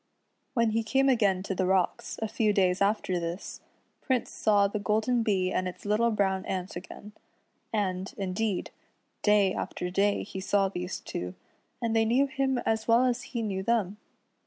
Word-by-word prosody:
When 230 Hz, -2 st, +3 dB
he 225 Hz, +1 st, +1 dB
came 265 Hz, +5 st, +2 dB
again 200 Hz, -7 st, +2 dB
to 195 Hz, -, -3 dB
the 185 Hz, 0 st, 0 dB
rocks, 190 Hz, -1 st, 0 dB
a -, -, 0 dB
few 215 Hz, -1 st, +1 dB
days 185 Hz, -2 st, +2 dB
after 200 Hz, -3 st, +1 dB
this, 170 Hz, +2 st, -5 dB, 0.4 s
Prince 255 Hz, -3 st, 0 dB
saw 205 Hz, -2 st, +3 dB
the 210 Hz, +1 st, -3 dB
golden 220 Hz, +4 st, +1 dB
Bee 190 Hz, -5 st, +1 dB
and 185 Hz, -, 0 dB
its 180 Hz, -, -8 dB
little 215 Hz, +3 st, +2 dB
brown 195 Hz, -3 st, +1 dB
ant 185 Hz, -1 st, -3 dB
again, 190 Hz, +3 st, -9 dB, 0.6 s
and, 190 Hz, -3 st, -1 dB
indeed, 195 Hz, +1 st, -2 dB, 0.5 s
day 205 Hz, -2 st, +4 dB
after 180 Hz, 0 st, -4 dB
day 200 Hz, +2 st, +2 dB
he 190 Hz, -, -7 dB
saw 195 Hz, 0 st, +2 dB
these 180 Hz, 0 st, -4 dB
two, 90 Hz, +1 st, -5 dB, 0.5 s
and 230 Hz, -1 st, 0 dB
they 225 Hz, 0 st, +4 dB
knew 250 Hz, +5 st, +3 dB
him 270 Hz, -2 st, 0 dB
as 220 Hz, 0 st, 0 dB
well 235 Hz, +2 st, +5 dB
as 250 Hz, -1 st, 0 dB
he 235 Hz, -3 st, -3 dB
knew 195 Hz, -3 st, -2 dB
them. 210 Hz, -2 st, 0 dB
205 Hz, 175 wpm, -28 LUFS, 190-225 Hz, 0.6 s, well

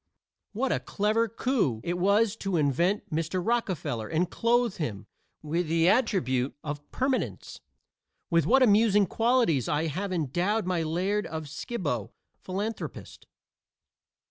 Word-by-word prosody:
What 255 Hz, +5 st, 0 dB
a -, -, +1 dB
clever 215 Hz, +3 st, 0 dB
coup 225 Hz, -, 0 dB
it 175 Hz, -, -1 dB
was 200 Hz, +4 st, +2 dB
to 195 Hz, -4 st, -1 dB
invent 165 Hz, +7 st, +1 dB
Mr. 165 Hz, +3 st, -1 dB
Rockefeller 185 Hz, -, -1 dB
and 170 Hz, +6 st, 0 dB
clothe 235 Hz, -2 st, +1 dB
him 115 Hz, -, -4 dB, 0.4 s
with 165 Hz, +3 st, -1 dB
the 165 Hz, +1 st, +2 dB
attribute 160 Hz, -, +1 dB
of 145 Hz, -1 st, -6 dB
permanence! 260 Hz, 0 st, -2 dB, 0.7 s
With 165 Hz, -1 st, +3 dB
what 265 Hz, +3 st, +5 dB
amusing 210 Hz, -2 st, +5 dB
qualities 225 Hz, -, +2 dB
I 150 Hz, +2 st, +1 dB
have 185 Hz, +6 st, -3 dB
endowed 180 Hz, -, 0 dB
my 180 Hz, -2 st, 0 dB
laird 185 Hz, +6 st, -1 dB
of 160 Hz, -1 st, -5 dB
Skibo, 145 Hz, -, -4 dB, 0.3 s
philanthropist. 205 Hz, +4 st, -5 dB
185 Hz, 125 wpm, -28 LUFS, 155-220 Hz, 0.7 s, what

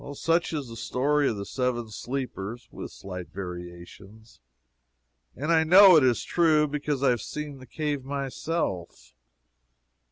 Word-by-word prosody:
Such 165 Hz, +4 st, 0 dB
is 145 Hz, -5 st, -3 dB
the 115 Hz, -, -9 dB
story 140 Hz, +5 st, +1 dB
of 110 Hz, -, -3 dB
the 100 Hz, -, -5 dB
Seven 120 Hz, -3 st, -2 dB
Sleepers, 120 Hz, -2 st, -5 dB
(with -, -, -7 dB
slight 90 Hz, -2 st, -8 dB
variations,) 90 Hz, -, -10 dB, 1.0 s
and 150 Hz, +5 st, -2 dB
I 160 Hz, -1 st, +5 dB
know 185 Hz, +3 st, +8 dB
it 155 Hz, -, +6 dB
is 125 Hz, -2 st, +2 dB
true, 155 Hz, -3 st, +3 dB
because 145 Hz, -1 st, -2 dB
I 135 Hz, -, +5 dB
have 120 Hz, -3 st, -1 dB
seen 150 Hz, +1 st, -6 dB
the 130 Hz, -, -13 dB
cave 145 Hz, +1 st, -3 dB
myself. 135 Hz, -, -4 dB
130 Hz, 140 wpm, -26 LUFS, 110-150 Hz, 1.0 s, know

